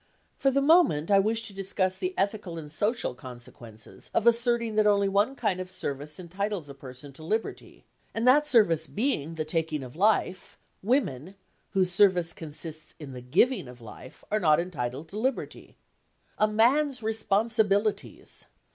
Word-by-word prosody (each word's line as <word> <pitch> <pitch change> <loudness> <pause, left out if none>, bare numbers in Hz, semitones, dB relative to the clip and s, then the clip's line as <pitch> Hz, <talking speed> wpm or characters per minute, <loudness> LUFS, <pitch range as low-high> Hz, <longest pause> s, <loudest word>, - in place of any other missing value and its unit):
For 270 - +1
the 275 +1 +1
moment 280 - +4
I 200 - +6
wish 220 +3 +1
to 210 - -8
discuss 190 -1 -1
the 370 0 -4
ethical 200 -4 -2
and 150 -2 -8
social 210 - -1
consequences 120 -3 -12
of 225 - +2
asserting 235 -1 +3
that 215 0 +3
only 200 -1 +3
one 205 +7 +1
kind 210 -8 -1
of 185 0 -6
service 150 -2 -5
entitles 185 -1 -4
a - - -8
person 135 +1 -12
to 155 - -12
liberty, 220 +7 -4 0.3
and 225 +2 -2
that 295 +4 +5
service 170 - +3
being 185 - -1
the 155 -1 -3
taking 155 -2 -2
of 125 +1 -10
life, 195 0 0 0.2
women, 190 - -1 0.4
whose 185 -2 +2
service 180 -3 +3
consists 155 0 -9
in 145 -4 -9
the 125 - -8
giving 170 - +1
of 125 0 -12
life, 115 +3 -13
are 215 - +2
not 155 -5 +4
entitled 150 -4 -4
to 210 - -6
liberty. 260 +3 -4 0.6
"A 215 - +4
man's 250 +4 +2
responsibilities!" 215 -1 0
195 Hz, 160 wpm, -27 LUFS, 155-225 Hz, 0.6 s, I